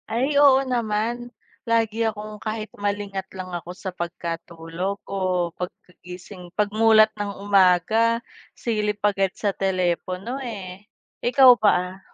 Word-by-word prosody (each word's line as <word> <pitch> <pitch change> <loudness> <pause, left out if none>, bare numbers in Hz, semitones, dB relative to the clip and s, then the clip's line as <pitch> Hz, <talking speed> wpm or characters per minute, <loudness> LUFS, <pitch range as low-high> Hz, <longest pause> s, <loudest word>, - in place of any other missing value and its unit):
Ay 250 +3 +2 0.2
oo 265 -1 +7
naman, 225 0 0 0.5
lagi 225 -1 +1
akong 215 0 -5
kahit 215 0 -4
malingat 200 -2 -2
lang 185 -1 -6
ako 175 0 -6
sa 190 - -6
pagkatulog 170 +1 -5
o 195 - -6 0.4
pagkagising, 180 0 -9
pag-mulat 215 +1 +4
ng 205 -1 -3
umaga 205 +4 +3 0.3
silip 210 -3 -2
agad 195 -2 +2
sa 205 - 0
telepono, 185 +3 -1
eh. 200 -6 -7 0.4
Ikaw 255 +2 +7
ba? 185 -2 +2
200 Hz, 115 wpm, -23 LUFS, 180-220 Hz, 0.5 s, oo